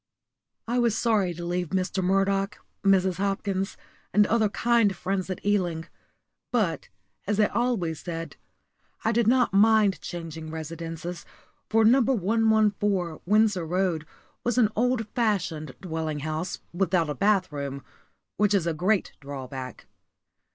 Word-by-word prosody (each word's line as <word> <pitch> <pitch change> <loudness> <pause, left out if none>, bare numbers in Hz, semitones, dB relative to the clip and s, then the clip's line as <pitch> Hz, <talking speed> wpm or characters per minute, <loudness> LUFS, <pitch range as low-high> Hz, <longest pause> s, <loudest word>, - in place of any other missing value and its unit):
*_ 235 - -2
I 250 - +2
was 235 -2 +2
sorry 210 -6 +2
to 170 +1 -6
leave 175 -1 -2
Mr. 185 +1 -1
Murdoch, 195 +1 +1 0.3
Mrs. 190 -2 +3
Hopkins, 195 0 -1 0.3
and 210 0 +5
other 220 0 +2
kind 230 -2 +2
friends 190 +1 -2
at 185 - -5
Ealing; 175 -6 0 0.7
but, 210 -9 0 0.4
as 205 +1 0
I 210 - +6
always 205 - -1
said, 165 -3 -6 0.7
I 225 - +3
did 235 -1 +2
not 250 -2 +3
mind 210 -1 +4
changing 165 -2 -6
residences, 165 +2 -6 0.5
for 225 0 +4
No. 255 +5 +6
114, 210 -6 +1
Windsor 210 -3 +3
Road, 175 -3 0 0.4
was 245 0 0
an 225 -4 +5
old 240 -1 +1
fashioned 180 - -1
dwelling 160 -4 -3
house 155 +4 -3
without 175 -2 +1
a - - -1
bathroom, 145 -9 0 0.5
which 205 0 +3
is 185 -4 +1
a 170 - 0
great 185 +6 +1
drawback. 135 -2 -7
195 Hz, 135 wpm, -26 LUFS, 165-215 Hz, 0.7 s, I